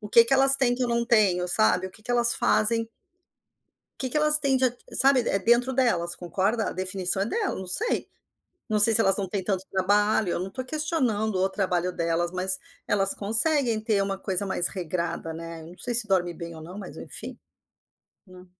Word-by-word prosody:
O 210 Hz, -, -9 dB
que 230 Hz, +2 st, +6 dB
que 235 Hz, -, -3 dB
elas 270 Hz, 0 st, +6 dB
têm 250 Hz, -3 st, +2 dB
que 255 Hz, -, -4 dB
eu -, -, -3 dB
não 235 Hz, 0 st, -1 dB
tenho, 195 Hz, -7 st, +2 dB
sabe, 190 Hz, -2 st, +2 dB
o -, -, -10 dB
que 215 Hz, -, -17 dB
que 245 Hz, -, -7 dB
elas 240 Hz, -1 st, +4 dB
fazem 230 Hz, +1 st, +1 dB, 1.1 s
O -, -, -51 dB
que 260 Hz, -, -2 dB
que 300 Hz, -, -1 dB
elas 300 Hz, 0 st, +4 dB
têm 275 Hz, -2 st, +1 dB
de 260 Hz, -, +2 dB
a 245 Hz, -, +1 dB, 0.2 s
sabe, 270 Hz, 0 st, +4 dB
é 195 Hz, -, +1 dB
dentro 240 Hz, +4 st, +2 dB
delas, 175 Hz, -10 st, 0 dB
concorda? 195 Hz, +6 st, -2 dB
A -, -, -7 dB
definição 185 Hz, 0 st, -1 dB
é -, -, 0 dB
delas, 415 Hz, -, -2 dB
não 190 Hz, -, -8 dB
sei. 445 Hz, -, +1 dB, 0.6 s
Não 215 Hz, -1 st, 0 dB
sei 225 Hz, +2 st, +8 dB
se 225 Hz, -, +5 dB
elas 195 Hz, -, +2 dB
não 195 Hz, -2 st, -3 dB
têm 195 Hz, -1 st, -4 dB
tanto 190 Hz, -1 st, -2 dB
trabalho, 205 Hz, +1 st, +1 dB
eu -, -, -2 dB
não 190 Hz, -, -5 dB
tô 255 Hz, +5 st, -6 dB
questionando 255 Hz, -, -1 dB
o 190 Hz, +1 st, +1 dB
trabalho 180 Hz, -2 st, -2 dB
delas, 170 Hz, 0 st, -2 dB
mas 185 Hz, +1 st, -1 dB, 0.3 s
elas 195 Hz, -1 st, +2 dB
conseguem 230 Hz, +3 st, +3 dB
ter 215 Hz, -2 st, 0 dB
uma 195 Hz, 0 st, -3 dB
coisa 195 Hz, 0 st, -2 dB
mais 180 Hz, -2 st, 0 dB
regrada, 170 Hz, -2 st, -4 dB
né. 165 Hz, 0 st, -8 dB
Eu 160 Hz, -, -12 dB
não 180 Hz, -, -15 dB
sei 240 Hz, -, -4 dB
se 230 Hz, -2 st, +2 dB
dorme 180 Hz, -2 st, 0 dB
bem 170 Hz, 0 st, -9 dB
ou 160 Hz, -, -11 dB
não, 180 Hz, +5 st, -10 dB
mas 195 Hz, -, -10 dB
enfim. -, -, -8 dB, 0.9 s
Hum. 185 Hz, 0 st, -15 dB
205 Hz, 220 wpm, -25 LUFS, 180-240 Hz, 1.1 s, sei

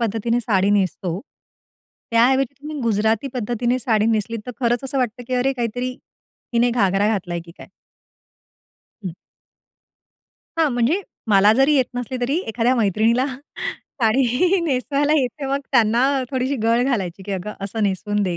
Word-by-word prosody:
पद्धतीने 230 Hz, +1 st, 0 dB
साडी 200 Hz, -4 st, +2 dB
नेसतो, 185 Hz, -2 st, 0 dB, 0.9 s
त्याऐवजी 260 Hz, +3 st, +3 dB
तुम्ही 300 Hz, 0 st, -6 dB
गुजराती 220 Hz, +2 st, +1 dB
पद्धतीने 240 Hz, +1 st, 0 dB
साडी 220 Hz, -3 st, +1 dB
नेसलीत 225 Hz, +1 st, 0 dB
तर -, -, -4 dB
खरंच 240 Hz, +1 st, +1 dB
असं 270 Hz, 0 st, -2 dB
वाटतं, 245 Hz, -1 st, -1 dB
की 255 Hz, -, -1 dB
अरे 255 Hz, +2 st, +2 dB
काहीतरी 245 Hz, 0 st, -2 dB, 0.6 s
हिने 240 Hz, +1 st, +3 dB
घागरा 200 Hz, -3 st, +2 dB
घातलाय 175 Hz, -4 st, -3 dB
की 170 Hz, -, -13 dB
काय? -, -, -11 dB, 1.4 s
हं. 180 Hz, -, -2 dB, 1.5 s
हां, 320 Hz, -2 st, +4 dB
म्हणजे 245 Hz, +10 st, +1 dB, 0.3 s
मला 205 Hz, 0 st, +6 dB
जरी 270 Hz, +6 st, +4 dB
येत 260 Hz, -, +4 dB
नसली 245 Hz, +1 st, -3 dB
तरी 270 Hz, +6 st, 0 dB
एखाद्या 235 Hz, +3 st, +1 dB
मैत्रिणीला 225 Hz, +3 st, +2 dB
साडी 265 Hz, -, 0 dB
नेसवायला 285 Hz, +1 st, +1 dB
येते 270 Hz, +3 st, -3 dB
मग 275 Hz, +1 st, 0 dB
त्यांना 235 Hz, 0 st, +4 dB, 0.3 s
थोडीशी 260 Hz, +1 st, -1 dB
गळ 230 Hz, +2 st, +3 dB
घालायची 195 Hz, -8 st, -2 dB
की 200 Hz, -, -5 dB
"अगं 195 Hz, +2 st, -4 dB
असं 215 Hz, +3 st, -3 dB
नेसून 205 Hz, +1 st, 0 dB
दे" 180 Hz, -3 st, -1 dB
235 Hz, 145 wpm, -21 LUFS, 210-260 Hz, 1.5 s, मला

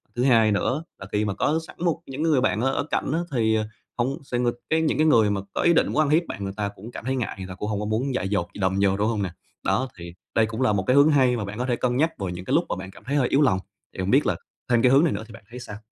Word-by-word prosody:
thứ 120 Hz, -, 0 dB
hai 115 Hz, -5 st, +5 dB
nữa 130 Hz, +9 st, 0 dB, 0.2 s
là 100 Hz, -, -7 dB
khi 105 Hz, +1 st, +1 dB
mà 100 Hz, -, -1 dB
có 150 Hz, +10 st, +1 dB
sẵn -, -, -12 dB
một 170 Hz, -3 st, +1 dB
những 135 Hz, +3 st, -4 dB
người 155 Hz, -5 st, +3 dB
bạn 120 Hz, -4 st, +1 dB
ở 135 Hz, +2 st, +2 dB
ở -, -, 0 dB
cạnh -, -, 0 dB
á 165 Hz, -, +1 dB
thì, 110 Hz, -4 st, +2 dB
ờ, 110 Hz, -1 st, 0 dB, 0.3 s
hông 130 Hz, +4 st, 0 dB
sẽ 125 Hz, -3 st, -3 dB
nghịch 120 Hz, -1 st, +1 dB, 0.2 s
cái 160 Hz, 0 st, +2 dB
những 160 Hz, -, +1 dB
cái 155 Hz, -, +3 dB
người 115 Hz, -8 st, +5 dB
mà 100 Hz, -1 st, -1 dB
có -, -, -1 dB
ý 170 Hz, -, +4 dB
định -, -, +3 dB
muốn -, -, -2 dB
ăn 155 Hz, -2 st, +3 dB
hiếp 160 Hz, +4 st, +4 dB
bạn 100 Hz, -, -6 dB
người 95 Hz, 0 st, -4 dB
ta 105 Hz, -1 st, -1 dB
cũng 110 Hz, +5 st, -10 dB
cảm 115 Hz, -, -8 dB
thấy 130 Hz, +1 st, 0 dB
ngại, 125 Hz, -4 st, -2 dB
người 95 Hz, -1 st, -6 dB
ta 90 Hz, -, -8 dB
cũng 105 Hz, +2 st, -4 dB
hông 105 Hz, -2 st, -1 dB
có 105 Hz, -, -3 dB
muốn 115 Hz, +6 st, -1 dB
dại 95 Hz, -, -1 dB
dột 90 Hz, -4 st, 0 dB
gì -, -, -10 dB
đâm 95 Hz, +1 st, +1 dB
vô, 95 Hz, -1 st, +3 dB
đúng 105 Hz, +1 st, +1 dB
hông 110 Hz, -3 st, 0 dB
nè? 95 Hz, -, -2 dB, 0.4 s
Đó 130 Hz, -, +1 dB
thì 85 Hz, 0 st, -9 dB, 0.2 s
đây 115 Hz, -, +4 dB
cũng 110 Hz, +3 st, -5 dB
là 130 Hz, -5 st, +3 dB
một 95 Hz, -2 st, 0 dB
cái 125 Hz, -, +4 dB
hướng 140 Hz, +2 st, +6 dB
hay 130 Hz, -4 st, +3 dB
mà 105 Hz, -, -3 dB
bạn 100 Hz, +1 st, -7 dB
có 125 Hz, -, 0 dB
thể 125 Hz, -2 st, +1 dB
cân 125 Hz, 0 st, 0 dB
nhắc 160 Hz, +3 st, +1 dB
vào 95 Hz, -2 st, -3 dB
những 90 Hz, +1 st, -6 dB
cái -, -, -2 dB
lúc -, -, +4 dB
mà -, -, -1 dB
bạn 95 Hz, +1 st, -8 dB
cảm 95 Hz, -, -16 dB
thấy 140 Hz, +6 st, -2 dB
hơi 135 Hz, -4 st, +3 dB
yếu 140 Hz, -, +3 dB
lòng, 110 Hz, -10 st, +3 dB, 0.3 s
thì -, -, -10 dB
hông 95 Hz, +1 st, -1 dB
biết 135 Hz, +6 st, +4 dB
là -, -, +1 dB, 0.3 s
thêm 120 Hz, -1 st, +4 dB
cái 125 Hz, 0 st, +5 dB
hướng 135 Hz, +3 st, +6 dB
này 165 Hz, -, +2 dB
nữa -, -, -4 dB
thì 110 Hz, -, -13 dB
bạn 115 Hz, -, -13 dB
thấy 125 Hz, +1 st, -8 dB
sao? 110 Hz, -4 st, -8 dB
120 Hz, 345 wpm, -24 LUFS, 100-135 Hz, 0.4 s, hướng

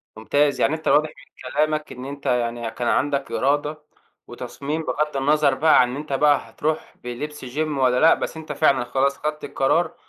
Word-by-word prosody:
ممتاز، 145 Hz, +6 st, +1 dB
يعني 140 Hz, -, +3 dB
أنت 160 Hz, -, -7 dB
واضح 155 Hz, +1 st, +4 dB
من 135 Hz, -3 st, -13 dB
كلامك 155 Hz, +1 st, 0 dB
إن 125 Hz, +1 st, -8 dB
أنت 140 Hz, 0 st, -8 dB
يعني 120 Hz, -1 st, -1 dB
كان 120 Hz, 0 st, -4 dB
عندك 140 Hz, -1 st, 0 dB
إرادة 145 Hz, +2 st, 0 dB, 0.4 s
وتصميم 140 Hz, +6 st, -5 dB
بغض 150 Hz, +2 st, -1 dB
النظر 145 Hz, +1 st, +3 dB
بقى 155 Hz, +4 st, +5 dB
عن 125 Hz, -, +1 dB
إن 125 Hz, -, -5 dB
أنت 150 Hz, -1 st, -5 dB
بقى 140 Hz, -4 st, +2 dB
هتروح 155 Hz, +6 st, -3 dB
بلبس 130 Hz, +4 st, -6 dB
جيم 150 Hz, +3 st, -2 dB
والّا 125 Hz, -1 st, +3 dB
لأ، 160 Hz, -, +7 dB
بس 160 Hz, -, -4 dB
أنت 160 Hz, -, -7 dB
فعلًا 135 Hz, -5 st, +2 dB
خلاص 135 Hz, +3 st, 0 dB
خدت 150 Hz, 0 st, -4 dB
القرار، 160 Hz, +6 st, 0 dB
140 Hz, 185 wpm, -22 LUFS, 125-150 Hz, 0.4 s, لأ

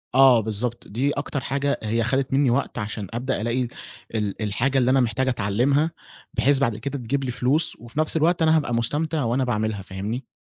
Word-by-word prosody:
آه 130 Hz, -3 st, +7 dB
بالضبط، 110 Hz, +3 st, -2 dB
دي 130 Hz, +7 st, 0 dB
أكتر 145 Hz, 0 st, -3 dB
حاجة 140 Hz, +2 st, -1 dB
هي 115 Hz, +2 st, 0 dB
خدت 135 Hz, +3 st, 0 dB
منّي 135 Hz, -2 st, +3 dB
وقت 135 Hz, 0 st, -1 dB
عشان 105 Hz, -2 st, -4 dB
أبدأ 125 Hz, -1 st, -2 dB
ألاقي 120 Hz, +2 st, 0 dB, 0.5 s
ال 105 Hz, 0 st, -2 dB
الحاجة 120 Hz, +6 st, 0 dB
اللي 130 Hz, 0 st, +3 dB
أنا 135 Hz, -, +4 dB
محتاج 130 Hz, +2 st, 0 dB
أتعلّمها، 130 Hz, +8 st, +1 dB, 0.4 s
بحيث 135 Hz, +4 st, +3 dB
بعد 115 Hz, -6 st, +1 dB
كده 140 Hz, +4 st, -4 dB
تجيب 135 Hz, +3 st, -2 dB
لي 125 Hz, -, -2 dB
فلوس 135 Hz, +6 st, +2 dB
وفي 120 Hz, +6 st, -7 dB
نفْس 155 Hz, +1 st, +2 dB
الوقت 170 Hz, +2 st, +2 dB
أنا 160 Hz, 0 st, +5 dB
هابقى 145 Hz, -6 st, -1 dB
مستمتع 150 Hz, +6 st, 0 dB
وأنا 120 Hz, +3 st, +1 dB
باعملها 110 Hz, -4 st, -1 dB
فاهمني؟ 105 Hz, +7 st, -5 dB
125 Hz, 190 wpm, -24 LUFS, 115-140 Hz, 0.5 s, آه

